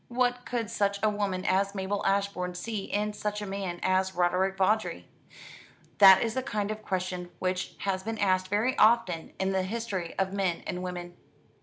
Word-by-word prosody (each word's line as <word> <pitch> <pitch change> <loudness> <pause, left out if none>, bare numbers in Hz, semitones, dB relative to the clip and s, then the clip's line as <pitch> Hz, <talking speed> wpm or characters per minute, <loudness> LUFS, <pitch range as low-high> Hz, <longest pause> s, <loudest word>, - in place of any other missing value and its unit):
What 245 0 0
could 230 -3 -2
such 200 -3 +1
a 215 - +4
woman 195 -3 -2
as 195 +2 +1
Mabel 195 +1 -2
Ashbourne 195 -2 0
see 210 +1 -4
in 210 +1 -1
such 210 0 -3
a 210 - -5
man 190 -3 -4
as 185 0 +1
Roderick 180 +2 +1
Vawdrey. 210 +4 +1 0.9
That 190 -2 +9
is 225 -1 -2
a 260 - 0
kind 210 -5 -2
of 215 0 -5
question 185 -2 -3
which 185 0 -2
has 190 -1 -1
been 225 +3 -4
asked 185 -2 +2
very 215 +7 +1
often 200 -8 +3
in 190 0 0
the 190 -1 +1
history 195 -3 -4
of 190 0 0
men 190 -4 -1
and 180 - -4
women. 175 -1 -6
195 Hz, 180 wpm, -28 LUFS, 185-210 Hz, 0.9 s, That